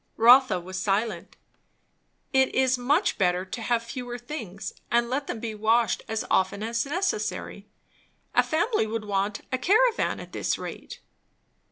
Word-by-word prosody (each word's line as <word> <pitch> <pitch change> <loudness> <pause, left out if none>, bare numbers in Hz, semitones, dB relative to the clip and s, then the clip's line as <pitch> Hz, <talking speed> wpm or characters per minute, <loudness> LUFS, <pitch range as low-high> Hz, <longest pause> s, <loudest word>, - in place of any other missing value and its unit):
Rotha 240 -3 +6
was 185 +2 -6
silent. 205 +3 -1 1.0
"It 265 0 +3
is 260 -1 +3
much 285 +10 +1
better 180 -1 +1
to 225 +5 -6
have 230 0 0
fewer 245 +1 -6
things, 230 - -7 0.2
and 235 0 +1
let 280 +2 -1
them 225 - -4
be 225 -1 -4
washed 220 +1 +2
as 220 0 -2
often 190 +2 +1
as 230 +3 -1
necessary. 215 - -2 0.7
A - - +5
family 335 - 0
would 220 0 -4
want 205 +1 -1
a 255 - 0
caravan 445 - +2
at - - -10
this - - -1
rate." - - -8
230 Hz, 150 wpm, -26 LUFS, 210-260 Hz, 1.0 s, Rotha